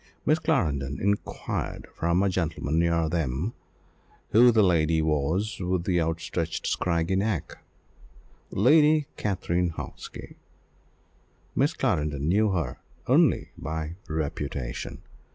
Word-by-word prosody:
Miss 155 +1 +3
Clarendon 75 - 0
inquired 100 +1 -2
from 85 +3 +1
a 100 - +2
gentleman 80 -3 -1
near 85 -1 +2
them, 80 - -1 0.8
who 120 +2 +7
the 110 -2 +4
lady 80 -3 +3
was 80 +7 0
with 90 -1 -1
the 90 -1 +1
outstretched 80 0 -2
scraggy 85 +1 0
neck 100 -3 -2 0.9
Lady 150 +7 +4
Katrine 90 -3 0
Hawksby. 80 - -8 1.2
Miss - - +2
Clarendon 75 -1 0
knew 105 +5 +3
her 85 -10 -2 0.3
only - - +3
by 80 +1 -4
reputation. 70 -5 -4
85 Hz, 105 wpm, -27 LUFS, 80-100 Hz, 1.2 s, who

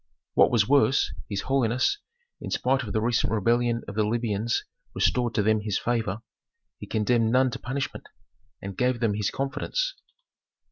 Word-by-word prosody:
What - - +5
was 110 -4 +2
worse, 140 -1 +3 0.2
his 100 -2 -2
holiness, 130 - +1 0.4
in - - -5
spite 130 +1 +1
of 110 -6 -6
the 110 - +1
recent 115 +1 +1
rebellion 115 +2 +1
of 105 - -6
the 105 +1 +1
Libyans 115 0 -1 0.3
restored 120 -3 +1
to 105 - +2
them 110 0 +2
his 105 -2 -1
favor; 115 -2 -1 0.6
he - - -8
condemned 115 +1 +1
none 130 +1 +3
to - - -5
punishment, 135 +2 -4 0.6
and 100 -1 -6
gave 125 +2 +1
them 110 -3 +1
his 105 -1 0
confidence. - - -2
115 Hz, 160 wpm, -26 LUFS, 110-125 Hz, 0.6 s, What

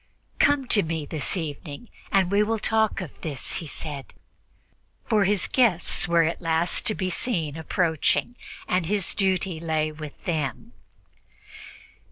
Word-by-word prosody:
"Come 285 -2 +4
to 205 - +5
me 160 -3 -3
this 155 +6 -2
evening, 155 +4 -5 0.2
and 190 -2 +3
we 200 +1 +4
will 225 +2 +1
talk 220 -1 +1
of 180 - -9
this," 145 -5 -2
he 165 - -6
said, 140 -2 -6 0.9
for 210 -2 +3
his 200 -1 +2
guests 215 -9 +2
were 170 -1 +4
at 165 +3 -1
last 165 0 +1
to 215 - +1
be 185 -1 -1
seen 170 - -1
approaching, 160 +7 0 0.3
and 180 -3 +1
his 200 -1 0
duty 190 -3 0
lay 155 -1 0
with 150 -1 -9
them. 150 -8 -2
170 Hz, 145 wpm, -25 LUFS, 155-200 Hz, 0.9 s, to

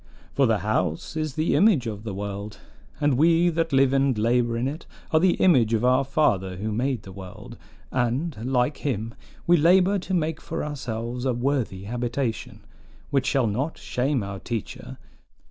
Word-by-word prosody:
"For 135 -2 +3
the 110 -1 +2
house 90 - -1
is 155 -3 -3
the 155 +1 +1
image 195 - +4
of 105 -3 -5
the 105 -4 -5
world, 100 +1 -5 0.4
and 145 -4 +2
we 170 +2 +4
that 165 -1 -1
live 135 -1 +4
and 135 -3 +2
labor 115 +1 +1
in 120 +2 0
it 155 +5 -6 0.2
are 155 - +4
the 180 +1 +3
image 120 -11 +4
of 115 +2 0
our 130 +2 +4
Father 105 -10 +1
who 110 +3 -3
made 125 +2 -1
the 95 - -10
world; 95 -1 -10 0.4
and, 130 +6 -1 0.2
like 125 +3 +1
him, 115 -5 -3 0.3
we 175 0 +5
labor 185 +5 +4
to 185 +1 -5
make 160 -2 -1
for - - -4
ourselves 125 -4 -4
a 130 -2 +1
worthy 120 -6 -1
habitation, 120 +2 -3 0.5
which 135 -2 +1
shall 135 -1 +2
not 125 +9 -2
shame 130 -1 -1
our 100 0 -6
teacher. 115 -1 -6
125 Hz, 175 wpm, -25 LUFS, 110-150 Hz, 0.5 s, we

